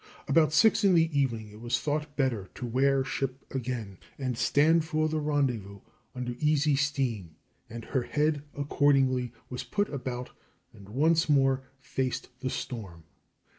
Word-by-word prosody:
About 155 +2 +4
six 215 +9 +4
in 195 -3 +5
the 165 -2 +3
evening 115 -6 0
it 105 +1 -13
was 120 +1 0
thought 150 0 -2
better 120 -9 0
to 125 - -5
"wear 135 +3 +2
ship" 135 0 -3
again 120 -7 -4 0.2
and 130 -3 -2
stand 155 +7 +3
for 155 -1 0
the 155 0 -1
rendezvous 125 -10 -1 0.3
under 125 -1 -3
easy 150 -1 +3
steam, 130 - -1 0.3
and 115 0 -7
her 130 - 0
head 150 +3 0 0.2
accordingly 135 -3 +2 0.2
was 125 - -3
put 205 0 -1
about 125 -3 -5 0.4
and 100 0 -14
once 160 +7 +2
more 135 -2 +3 0.2
faced 130 -1 -3
the 130 0 -2
storm. 95 -11 -6
135 Hz, 150 wpm, -29 LUFS, 120-150 Hz, 0.4 s, in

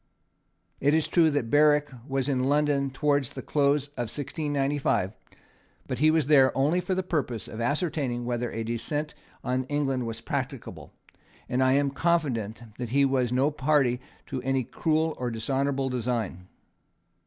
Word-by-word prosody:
It 145 +3 +3
is 160 - +2
true 165 -2 +4
that 140 -6 -1
Berwick 150 0 +4 0.2
was 135 -1 -1
in 130 -2 +1
London 145 -1 +2
towards 140 -1 +1
the - - -8
close 145 -1 +1
of 120 -6 -4
1695; 140 - -1 0.7
but - - -4
he 155 +2 +5
was 160 -2 +3
there 135 -3 +5
only 150 +7 +2
for 185 +1 -1
the 190 - -1
purpose 140 - -2
of 110 - -6
ascertaining 140 -3 -1
whether 120 0 -2
a 115 - -3
descent 145 +7 -3 0.3
on 130 +1 -1
England 135 -3 -1
was 115 -1 -5
practicable; - - -5 0.6
and 125 +1 0
I 130 0 +4
am 140 0 +2
confident 135 -9 0 0.2
that 120 -2 -3
he 140 +3 +3
was 130 -3 +1
no 135 +4 +2
party 135 -4 +2 0.2
to 130 - -4
any 135 0 0
cruel 160 +5 0
and 120 - -1
dishonourable 135 +3 -1
design." 115 -7 -3
135 Hz, 155 wpm, -27 LUFS, 125-150 Hz, 0.7 s, he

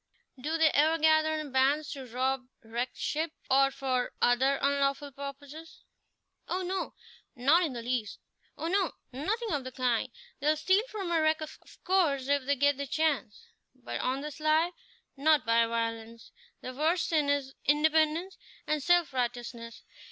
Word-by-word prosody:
"Do 315 +4 -1
they 320 -2 +4
ever 315 +3 +3
gather 315 0 +3
in 305 -3 -5
bands 275 +3 +2
to 270 -2 -7
rob 255 +2 -1 0.2
wrecked 235 +3 -4
ships, 315 +1 -2 0.2
or 275 +1 +5
for 260 -2 -2
other 265 +3 +3
unlawful 280 0 0
purposes?" 280 +4 -9 0.6
"Oh 370 +1 -2
no, 370 +1 -3 0.4
not 280 +8 +4
in 320 -7 -1
the 235 -1 -6
least! 240 -3 -2 0.4
Oh - - -5
no, 370 +1 +1 0.2
nothing 420 - -2
of 285 -3 -1
the 255 - -7
kind! 250 -1 0 0.3
They'll 300 +2 +2
steal 375 +6 +3
from 390 -5 -4
a 330 -2 +3
wreck, 310 0 +2
of 310 - -8 0.2
course, 310 -8 +2
if 285 -2 +2
they 285 +1 +2
get 285 +1 +2
the 280 0 -4
chance; 290 -8 -1 0.3
but 255 -1 -6
on 260 +2 -1
the 300 +1 -5
sly, 310 +3 +2 0.5
not 300 0 +3
by 230 0 +3
violence. 230 0 -4 0.3
Their 255 - -6
worst 320 +6 +1
sin 300 -3 +2
is 280 -2 0
independence 315 +4 +2 0.3
and 305 -1 0
self 345 -1 +3
righteousness. 240 -2 -4
285 Hz, 160 wpm, -29 LUFS, 255-315 Hz, 0.6 s, or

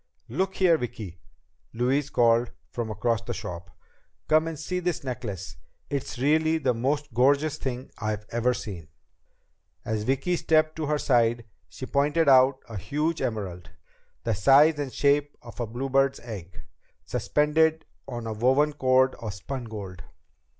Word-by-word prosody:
"Look 190 0 -1
here, 170 -4 +4
Vicki," 105 -7 -6 0.6
Louise 135 +4 +1
called 120 -1 +3 0.2
from 120 -2 -3
across 115 +2 0
the 120 0 -5
shop. 90 +2 -7 0.6
"Come 155 +1 +3
and 165 -1 -4
see 180 +5 -3
this 175 -5 -2
necklace. 110 -8 -5 0.3
It's 140 -3 -3
really 155 +4 +2
the 130 -5 +1
most 140 +4 -1
gorgeous 140 +5 +2
thing 130 -1 -4
I've 110 -2 -3
ever 120 +2 +1
seen!" 90 -8 -7 1.0
As 110 -1 -1
Vicki 135 +10 0
stepped 155 -1 +2
to 155 -2 -2
her 150 0 +1
side, 120 -4 +2 0.2
she 90 +10 -7
pointed 145 +4 +1
out 130 0 +5
a 115 -3 -7
huge 150 - -1
emerald, 90 -7 -4 0.5
the 115 - 0
size 140 +9 +5
and 140 -3 -3
shape 145 +1 +1
of 120 0 -12
a 120 - -2
bluebird's 135 +3 0
egg, 100 -7 -9 0.4
suspended 160 +2 +1 0.2
on 120 -3 -5
a 110 - -3
woven 135 +7 +2
cord 130 -1 +3
of 105 -3 -5
spun 125 +5 -6
gold. 100 -5 -8
130 Hz, 150 wpm, -26 LUFS, 115-150 Hz, 1.0 s, out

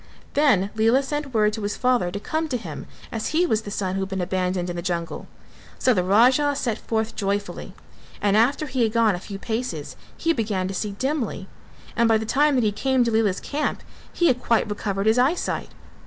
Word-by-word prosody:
Then 210 -10 +3
Lela 225 +5 +3
sent 295 0 -3
word 215 -2 +2
to 220 - -4
his 205 0 -3
father 250 -8 +2
to 200 +3 -5
come 315 +8 -2
to 260 -5 -1
him, 235 - -8 0.2
as 225 -2 -3
he 335 +3 +2
was 220 -10 +1
the 210 - -8
son 190 -2 -2
who 195 - -1
had 190 - -3
been 190 -1 -3
abandoned 180 0 -1
in 175 - -4
the 170 - -3
jungle, 170 -1 -3 0.5
so 255 - +3
the 185 -4 +1
Raja 255 +9 +4
set 235 -5 -2
forth 220 0 -2
joyfully 200 0 -3 0.4
and 205 -1 +2
after 260 +8 +3
he 260 -3 -2
had 220 -2 +2
gone 230 -3 +4
a 175 - -3
few 195 +1 -7
paces 220 - -4 0.2
he 330 0 +1
began 210 - -1
to 195 - -4
see 205 +1 -3
dimly, 245 -5 -2 0.5
and 235 0 +3
by 225 - +5
the 220 - -4
time 290 +5 +3
that 250 - +2
he 210 - +2
came 260 +4 +1
to 235 - 0
Lela's 215 -4 +2
camp 295 +1 -3 0.3
he 345 - 0
had 250 -6 +3
quite 230 -1 +2
recovered 205 -1 -2
his 220 +3 +4
eyesight. 280 +8 0
220 Hz, 215 wpm, -24 LUFS, 195-255 Hz, 0.5 s, by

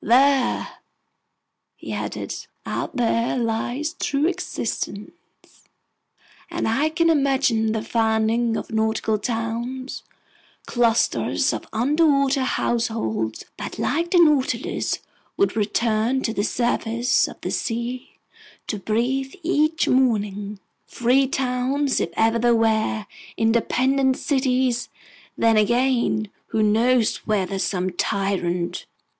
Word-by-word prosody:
"There," 265 +2 +2 1.0
he - - -7
added, - - -4 0.3
"out - - -4
there 235 0 +1
lies 245 +6 -2
true 285 +1 0
existence! 325 - -3 1.4
And - - -2
I 275 +8 +2
can 335 +1 +1
imagine 265 -7 +2
the 220 0 -2
founding 225 0 +1
of - - -6
nautical 220 -1 0
towns, 235 +4 -3 0.6
clusters 235 -2 +1
of - - -5
underwater 275 +2 +2
households 220 - -1
that, - - -6
like 340 +1 0
the 365 - +3
Nautilus, 280 -7 +2 0.4
would 395 - +2
return 225 +4 +1
to 225 - -1
the 205 - -1
surface 235 +1 +1
of - - -11
the - - -3
sea 235 +2 -3 0.5
to 210 - -3
breathe 250 +6 -1
each 320 -1 +1
morning, 210 -5 +1 0.3
free 255 +3 +2
towns 265 +2 0
if - - -1
ever 225 +1 +3
there 240 0 +3
were, 220 -1 +1 0.3
independent 260 +4 +2
cities! 255 -3 0 0.5
Then 225 -1 +3
again, 235 -1 +2 0.2
who 220 - 0
knows 225 +2 +3
whether 195 -2 0
some 185 -1 -1
tyrant 180 -2 -1
235 Hz, 105 wpm, -23 LUFS, 220-265 Hz, 1.4 s, the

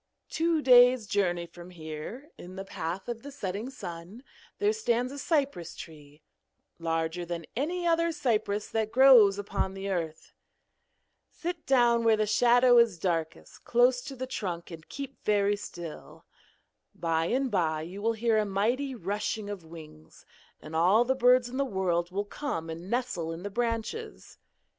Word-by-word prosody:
Two 325 -2 +1
days' 250 -2 +6
journey 180 -4 0
from 175 +1 -13
here, 170 - -8
in 180 +1 -11
the 195 0 -6
path 175 +1 -5
of 235 -1 -5
the 285 - -9
setting 210 -2 -4
sun, 185 -1 -9 0.3
there 415 +1 +2
stands 250 - 0
a 285 - -7
cypress 280 - -1
tree, 150 -2 -12 0.6
larger 165 +1 -2
than 170 -1 -5
any 345 +8 -2
other 335 0 +2
cypress 220 -8 -1
that 220 -1 -2
grows 240 -6 +7
upon 195 -1 -3
the 195 +1 -4
earth. 165 -3 -4 1.0
Sit 345 -1 -6
down 240 -3 +4
where 225 -1 +4
the 215 - +1
shadow 245 +3 +5
is 230 -6 +3
darkest, 165 -2 -3
close 245 +1 +3
to 270 - -8
the 260 0 -4
trunk, 180 -9 -5
and 160 -1 -11
keep 275 -1 -8
very 205 -1 +2
still. 175 -5 -9 0.7
By 165 -1 0
and 260 +6 0
by 160 -5 0
you 185 +5 -8
will 230 +2 +1
hear 225 0 +1
a - - +2
mighty 240 +8 -1
rushing 205 +1 -3
of 195 -4 -7
wings, 155 - -14 0.3
and 155 +1 -9
all 190 +8 +4
the 260 - +2
birds 250 -1 +4
in 250 +2 -6
the 275 - +2
world 185 -7 -1
will 200 +3 -3
come 205 - -4
and 170 +3 -8
nestle 235 -10 -2
in 165 +2 -7
the 205 - -5
branches. 240 - -4
210 Hz, 160 wpm, -28 LUFS, 175-250 Hz, 1.0 s, grows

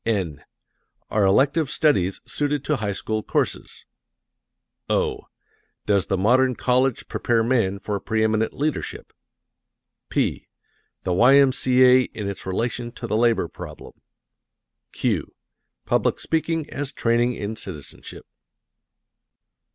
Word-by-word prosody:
(n) 90 -10 -2 0.7
"Are 105 - +2
Elective 135 +9 +3
Studies 100 - +1
Suited 145 -1 -2
to 150 - +1
High 105 -4 -2
School 110 +2 -3
Courses?" - - -2 1.0
(o) - - -1 0.6
"Does 100 -2 +2
the 95 - 0
Modern 125 +6 +3
College 130 +1 +1
Prepare 115 -1 +1
Men 110 -5 +1
for 100 0 -3
Preeminent 110 +1 0
Leadership?" 150 +1 -4 1.0
(p) - - -1 0.6
"The 90 - 0
Y.M.C.A. 130 +1 +5
in 105 -2 -3
Its 100 -1 -6
Relation 120 +5 -2
to 120 - -7
the 110 - -1
Labor 115 0 +2
Problem;" - - -10 1.0
(q) - - -2 0.5
"Public - - +1
Speaking 160 -1 -1
as 140 -1 -4
Training 120 -2 +1
in 105 +1 -4
Citizenship." 85 -9 -9
115 Hz, 110 wpm, -23 LUFS, 105-130 Hz, 1.0 s, Y.M.C.A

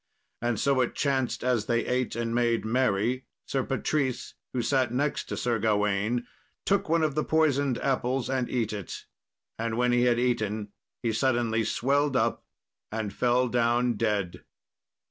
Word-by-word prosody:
And 120 -1 0
so 135 -2 +2
it 125 - -1
chanced 135 -3 0
as 125 -4 +1
they 120 0 +1
ate 125 -2 -1
and 115 0 -2
made 120 -2 +1
merry, 125 +1 +1 0.2
Sir 135 - -1
Patrice, 135 -1 -1 0.2
who 125 -2 -1
sat 130 -2 +1
next 140 +4 -1
to - - -5
Sir 120 -2 0
Gawain, 105 +2 +1 0.4
took 195 -4 +1
one 165 0 +3
of 155 -2 +1
the 155 +2 0
poisoned 145 -5 +2
apples 130 -1 0
and 130 -2 -1
eat 115 -4 -1
it, 100 -5 -6 0.5
and 115 0 -2
when 125 0 +2
he 120 0 +3
had 120 -1 +3
eaten 110 -4 0 0.3
he 115 -2 +1
suddenly 115 -2 +1
swelled 140 +5 +1
up - - 0 0.5
and 110 -2 -3
fell 125 +1 +2
down 120 0 +2
dead. 105 -5 -1
120 Hz, 160 wpm, -27 LUFS, 115-130 Hz, 0.5 s, one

